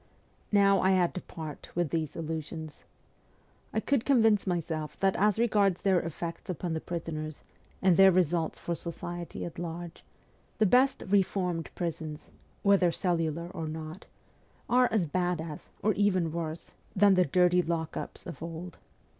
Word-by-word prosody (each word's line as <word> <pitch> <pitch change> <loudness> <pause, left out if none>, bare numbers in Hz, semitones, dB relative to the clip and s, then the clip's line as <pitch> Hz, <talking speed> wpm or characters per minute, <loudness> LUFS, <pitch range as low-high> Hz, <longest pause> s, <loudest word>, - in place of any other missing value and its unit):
Now, 200 -1 +5
I 190 0 +4
had 180 -2 +2
to 185 - -4
part 155 -4 -8
with 175 -3 0
these 160 -3 -2
illusions. 160 -1 -5 0.9
I - - 0
could 260 +2 +1
convince 225 -7 +4
myself 160 -3 -2
that 195 -1 +2
as 210 +1 +3
regards 205 -6 +2
their 190 -2 +4
effects 170 +1 -6
upon 175 -1 -2
the 160 - -2
prisoners, 155 -3 -5 0.4
and 185 -2 +5
their 195 0 +8
results 170 -2 +1
for 170 - -3
society 170 +1 -5
at 170 - -7
large, 170 0 -6 0.5
the 220 - +4
best 255 +6 +4
' - - -8
reformed^' 185 -4 +1
prisons 160 -3 -5 0.3
whether 195 -3 +4
cellular 170 -2 -1
or 165 -4 -4
not 155 +4 -7 0.6
are 250 0 +4
as 215 -6 +2
bad 175 +1 0
as, 160 -2 -7
or 215 - +3
even 185 -5 +2
worse, 165 0 -5 0.2
than 200 0 +6
the 185 -1 +5
dirty 180 +3 +4
lock 165 -2 -2
ups - - -6
of 170 - -8
old. 165 +1 -7
175 Hz, 155 wpm, -29 LUFS, 160-195 Hz, 0.9 s, their